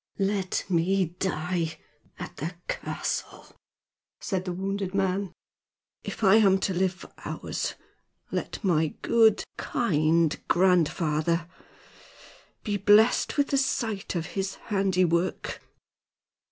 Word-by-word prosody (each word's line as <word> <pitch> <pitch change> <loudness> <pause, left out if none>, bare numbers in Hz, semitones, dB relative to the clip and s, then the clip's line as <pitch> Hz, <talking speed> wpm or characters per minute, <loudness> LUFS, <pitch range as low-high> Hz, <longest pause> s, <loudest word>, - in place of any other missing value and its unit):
"Let 195 -1 -1
me 180 0 +1
die 175 -3 -1 0.4
at - - -8
the 160 +5 -4
castle," - - -4 0.6
said 190 -2 -2
the 180 - -2
wounded 195 +1 -3
man. 195 -1 0 0.7
"If - - -6
I 195 +2 +7
am 195 -3 +5
to 190 - 0
live 185 +1 +1
for 185 - -14
hours, - - -4 0.6
let - - -4
my 160 -5 +1
good, 220 -2 +4
kind 160 -5 +2
grandfather 170 -2 +2 1.2
be 205 -1 -1
blessed 210 +8 +4
with 285 -1 +2
the 275 - +2
sight 225 -8 -1
of 165 -2 -1
his 195 0 -2 0.2
handiwork!" 185 -2 +1
185 Hz, 110 wpm, -27 LUFS, 170-200 Hz, 1.2 s, I